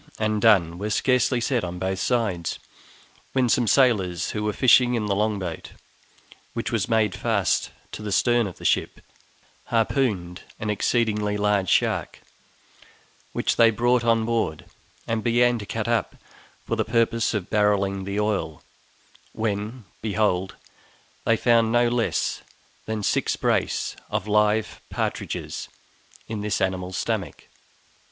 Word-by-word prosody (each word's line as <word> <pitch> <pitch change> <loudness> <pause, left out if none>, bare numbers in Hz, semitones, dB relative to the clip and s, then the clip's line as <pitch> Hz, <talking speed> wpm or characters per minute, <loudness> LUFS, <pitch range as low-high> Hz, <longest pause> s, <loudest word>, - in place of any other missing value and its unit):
and 110 -1 0
done! 90 -7 +4
were 105 +2 -3
scarcely 125 +3 +2
said 120 0 0
on 90 0 -4
both 95 +1 -2
sides, 100 -9 -1 0.8
when 130 -2 +2
some 120 0 +2
sailors 100 - +2
who 105 - -3
were 105 - 0
fishing 125 +1 +4
in 110 -3 -1
the 100 - 0
long 105 +1 0
boat, 90 -4 -6 0.8
which 115 +1 -3
was 110 -5 -1
made 110 -4 +2
fast 100 -1 0 0.2
to - - -7
the 105 -1 -4
stern 120 +2 +3
of 90 - -9
the - - -11
ship, - - +1 0.7
harpooned 110 -7 0 0.2
an 105 0 -1
exceedingly 105 -1 0
large 105 -2 +1
shark, - - +1 1.1
which - - -1
they 115 -1 +7
brought 120 +2 +2
on 115 -1 +2
board 110 -9 -1 0.4
and 115 -1 -2
began 120 0 +3
to 105 - -8
cut 110 0 -3
up 115 -1 0 0.5
for - - -1
the - - +1
purpose 115 0 +1
of 100 -4 -4
barrelling 100 -2 +1
the 100 +2 -3
oil, 100 -8 -2 0.7
when, 110 +2 -3 0.2
behold, 100 -3 0 0.7
they 115 - +3
found 115 -1 +3
no 120 0 +4
less 120 -1 -1 0.5
than 110 -1 -3
SIX - - +1
BRACE - - 0
OF 100 - -2
LIVE 105 +1 +1
PARTRIDGES - - -4 0.6
in 110 -2 -4
this 105 0 -1
animal's 95 -1 -2
stomach! - - -3
105 Hz, 140 wpm, -24 LUFS, 100-115 Hz, 1.1 s, they